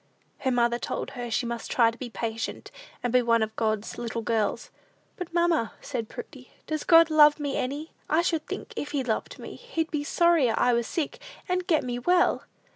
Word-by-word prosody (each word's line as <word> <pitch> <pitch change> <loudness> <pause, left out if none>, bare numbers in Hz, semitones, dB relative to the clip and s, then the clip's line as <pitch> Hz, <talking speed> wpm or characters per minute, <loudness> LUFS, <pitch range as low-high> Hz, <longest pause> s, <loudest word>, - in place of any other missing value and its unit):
Her 265 - 0
mother 240 -1 +2
told - - -4
her 245 -2 -5
she 230 +2 0
must 235 -1 -4
try 230 -2 +4
to 230 - -14
be 255 - -5
patient, 225 0 -4 0.3
and 245 -1 -1
be 250 - +6
one 230 -1 +3
of 220 0 -4
God's 220 -1 -1
little 230 -1 -3
girls. 220 -2 -1 0.4
"But, 360 -2 -6
mamma," 340 -9 +1
said 245 -6 -4
Prudy, 260 -5 -10 0.2
"does 310 -1 -3
God 330 -1 +6
love 300 -1 +6
me 285 -2 -2
any? 290 +5 -3 0.2
I 325 +3 +3
should 325 -3 -1
think, 460 - -6
if 290 -9 -5
he 280 -2 0
loved 225 -3 -2
me, - - -8
he'd 340 -10 -4
be 300 -2 -1
sorrier 320 -7 +3
I 245 - +3
was 235 -1 0
sick, 315 -4 -3 0.3
and 365 -1 -1
get 315 -5 +3
me 245 -1 -3
well." 355 +7 +2
260 Hz, 200 wpm, -27 LUFS, 235-320 Hz, 0.4 s, be